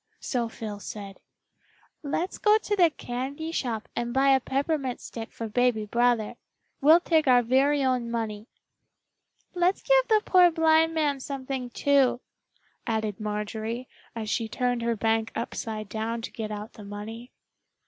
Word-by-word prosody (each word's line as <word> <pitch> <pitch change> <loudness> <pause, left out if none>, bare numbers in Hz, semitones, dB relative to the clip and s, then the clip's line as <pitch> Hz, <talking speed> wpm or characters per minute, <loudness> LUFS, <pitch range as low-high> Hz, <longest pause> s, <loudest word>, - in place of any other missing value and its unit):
So 240 -3 -2
Phil 215 -3 -7
said, 200 -1 -8 0.8
"Let's 325 +5 -3
go 425 0 +5
to 425 -1 -2
the 350 -4 +5
candy 280 +3 -5
shop 235 -8 -3
and 240 0 -2
buy 270 +1 +4
a 270 -1 +5
peppermint 270 0 -1
stick 225 -1 -8
for 230 - -5
baby 230 -1 +1
brother. 235 0 +1 0.4
We'll 315 +5 +7
take 320 -4 +2
our 245 -1 +6
very 275 +4 +3
own 250 -3 0
money." 220 -2 -3 1.1
"Let's 360 +1 +1
give - - +4
the 435 -2 +3
poor 360 -1 +6
blind 325 0 +3
man 295 -3 +1
something, 265 -2 -4
too," 275 -1 +2 0.7
added 220 -2 -1
Marjorie, 215 +3 -4 0.3
as 220 -2 -4
she 225 +1 -1
turned 245 +1 -1
her 235 0 0
bank 225 +1 0
upside 215 -2 -4
down 225 +2 -3
to - - -5
get 220 -2 -5
out 210 0 -6
the 210 - -11
money. 215 +4 -8
245 Hz, 150 wpm, -27 LUFS, 220-285 Hz, 1.1 s, We'll